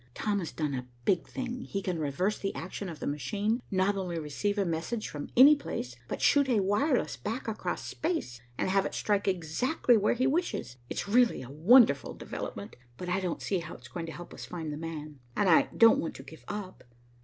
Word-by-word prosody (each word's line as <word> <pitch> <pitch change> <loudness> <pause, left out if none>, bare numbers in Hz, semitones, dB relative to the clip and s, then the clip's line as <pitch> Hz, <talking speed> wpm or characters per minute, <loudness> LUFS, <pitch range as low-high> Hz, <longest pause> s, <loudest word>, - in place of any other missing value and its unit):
Tom 205 -2 0
has 170 - -4
done 150 -3 -2
a 125 -1 -4 0.2
big 180 -4 +2
thing. 250 -1 -4
He 200 - -3
can 180 -3 -2
reverse 170 +8 0
the 195 - -3
action 190 +1 -5
of 160 -3 -8
the - - -5
machine, 200 - -1
not 190 +1 +2
only 180 -3 -3
receive 165 +7 -2
a 200 - +2
message 175 +7 -2
from 145 -1 -6
any 280 +4 +10
place, 125 - -5
but - - -4
shoot 280 -2 +4
a 235 -4 +3
wireless 235 +8 +1
back 230 +4 -4
across 220 - -3
space, 310 - -3 0.2
and - - 0
have 195 +1 +3
it - - -4
strike 205 -1 0
exactly 195 - +2
where 210 +2 +2
he 255 +2 +1
wishes. 270 - -1
It's - - -3
really 235 - +3
a 130 - -10
wonderful 170 - +5
development, 100 0 -6 0.2
but 180 +3 -5
I 180 +2 +1
don't 180 -3 -3
see 190 - 0
how 165 -1 -7
it's 125 0 -13
going 170 -2 -5
to - - -5
help 175 +1 -9
us - - -8
find 160 -4 -5
'the - - -5
man,' 155 -3 -6 0.2
and 205 - +2
I 165 - +5
don't 230 -1 +7
want 165 - -3
to 135 - -9
give 160 +4 -13
up. 205 -3 -6
190 Hz, 215 wpm, -30 LUFS, 160-220 Hz, 0.2 s, any